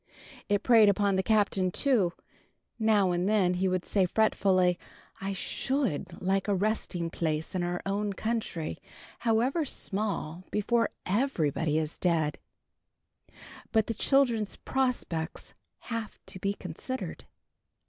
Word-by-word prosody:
It 205 -1 +2
preyed 225 -4 +7
upon 200 0 +2
the 190 - +2
Captain 200 -3 +2
too. 205 -5 +2 0.7
Now 210 -4 +3
and 175 +2 0
then 195 -4 +3
he 185 +1 +1
would 185 -1 -1
say, 190 -3 +2
fretfully, 185 -3 +2 0.4
"I 195 +1 -2
should 260 - -2
like 190 +2 0
a 200 - +2
resting 185 -4 -1
place 160 -2 -2
in 185 - -1
our 175 0 -2
own 200 +1 -1
country, 220 -7 -3 0.4
however 245 +7 +2
small, 195 - -2
before 230 +2 +1 0.2
_every_body 165 - +1
is 155 0 -3
dead! 160 -4 +1 1.3
But 220 -2 +3
the 230 - -2
children's 235 -3 +2
prospects 245 -11 -2 0.3
have 230 -3 -5
to 185 - -8
be 200 +2 -1
considered." 195 +10 -6
200 Hz, 125 wpm, -29 LUFS, 180-220 Hz, 1.3 s, preyed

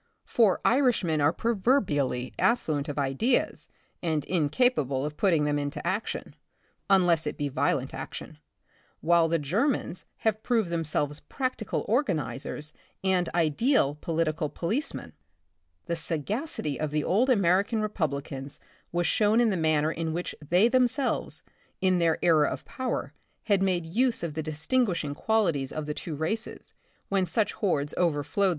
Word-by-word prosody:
For 215 -6 +3
Irishmen 230 - +3
are 145 +2 +4
proverbially 180 - 0
affluent 155 -12 +1
of 145 - -5
ideas 145 - 0 0.3
and 160 -4 -1
incapable 150 - +1
of 150 0 -4
putting 165 -5 +2
them 145 0 +1
into 145 0 -3
action, 200 +4 -3 0.5
unless 175 -5 +4
it - - -3
be 145 -1 -1
violent 135 - 0
action, - - -7 0.6
while 170 0 +4
the 165 +1 +2
Germans 185 - -1 0.2
have 220 -1 +2
proved 220 -8 0
themselves 150 -3 -1
practical 255 -6 -3
organizers 150 - -1 0.3
and 185 -2 +2
ideal 165 - +2
political 155 0 -1
policemen. 175 - -3 0.7
The 170 - -1
sagacity 165 - -3
of 155 - -1
the 150 0 -1
old 230 +9 +2
American 200 0 +3
Republicans 140 -9 -3 0.3
was 175 0 0
shown 215 +5 +3
in 235 -2 +4
the - - 0
manner 155 -2 +2
in 160 -1 -3
which 175 +2 -3
they 175 +8 +4
themselves, 255 +1 +1 0.4
in 185 -2 +2
their 165 -1 +2
era 155 -4 +5
of - - -6
power, 260 -1 -3 0.3
had 200 -3 +2
made 180 -3 +1
use 230 +6 +1
of 165 -3 -3
the 160 - -2
distinguish 165 +7 0
ing 145 -1 -3
qualities 170 -8 +1
of 155 -1 -4
the 150 - -3
two 155 +1 -5
races, 215 +10 -4 0.4
when 195 -2 +1
such 220 +1 0
hordes 145 -8 -1
overflowed 165 +3 +1
170 Hz, 145 wpm, -27 LUFS, 150-215 Hz, 0.7 s, era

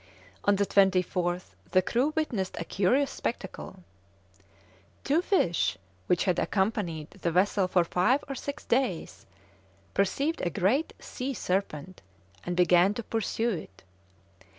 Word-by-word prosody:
On 205 - +5
the 200 +1 +1
24th 185 -2 +1 0.2
the 185 -1 +3
crew 250 +10 +1
witnessed 230 -12 -1
a 165 - -3
curious 245 +12 +2
spectacle: 190 -3 -5 1.2
"Two 300 +5 +2
fish, 175 - +1 0.3
which 180 - +2
had 180 -3 +1
accompanied 190 -6 -1
the 190 -3 -3
vessel 190 +2 +2
for 180 -1 +3
five 185 +11 +2
or 275 - -4
six 285 +2 -6
days, 180 - -1 0.7
perceived 275 - 0
a 175 - 0
great 205 - +1
sea 265 +1 -5
serpent, 185 -3 -3 0.4
and 175 0 -3
began 180 +3 +5
to 235 - -4
pursue 225 +1 -1
it. 95 - -7
190 Hz, 130 wpm, -28 LUFS, 180-240 Hz, 1.2 s, On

